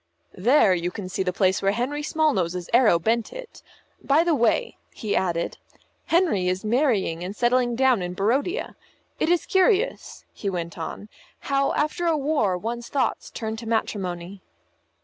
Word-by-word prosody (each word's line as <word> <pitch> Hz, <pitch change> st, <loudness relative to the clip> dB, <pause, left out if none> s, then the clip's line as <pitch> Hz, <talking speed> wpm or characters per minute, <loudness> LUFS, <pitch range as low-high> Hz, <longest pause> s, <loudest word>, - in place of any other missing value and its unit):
"There, 215 Hz, 0 st, +4 dB
you 175 Hz, 0 st, -1 dB
can 185 Hz, +1 st, -7 dB
see 190 Hz, -, -3 dB
the 185 Hz, -1 st, 0 dB
place 190 Hz, 0 st, +1 dB
where 195 Hz, 0 st, +2 dB
Henry 260 Hz, +6 st, -2 dB
Smallnose's 190 Hz, -, 0 dB
arrow 235 Hz, -7 st, +5 dB
bent 225 Hz, +6 st, 0 dB
it. -, -, -10 dB, 0.4 s
By 290 Hz, +4 st, +3 dB
the 340 Hz, -1 st, +2 dB
way," 290 Hz, -, +1 dB, 0.2 s
he 215 Hz, -3 st, -2 dB
added, 170 Hz, -2 st, -1 dB, 0.5 s
"Henry 325 Hz, -, +2 dB
is 185 Hz, +3 st, -1 dB
marrying 215 Hz, -, +1 dB
and 190 Hz, +3 st, -5 dB
settling 240 Hz, 0 st, +2 dB
down 260 Hz, -4 st, +3 dB
in 180 Hz, 0 st, -4 dB
Barodia. 270 Hz, -, -1 dB, 0.4 s
It -, -, +1 dB
is 350 Hz, -1 st, +2 dB
curious," 400 Hz, +4 st, +1 dB
he 200 Hz, -, -4 dB
went 170 Hz, -2 st, -4 dB
on, 165 Hz, +5 st, -6 dB, 0.3 s
"how 275 Hz, 0 st, 0 dB
after 305 Hz, +4 st, -1 dB
a 325 Hz, -2 st, +2 dB
war 280 Hz, -10 st, +1 dB
one's 235 Hz, +5 st, -5 dB
thoughts 280 Hz, -, -1 dB
turn 220 Hz, -2 st, -5 dB
to 225 Hz, 0 st, -8 dB
matrimony." 190 Hz, -4 st, -3 dB
225 Hz, 160 wpm, -24 LUFS, 185-290 Hz, 0.5 s, arrow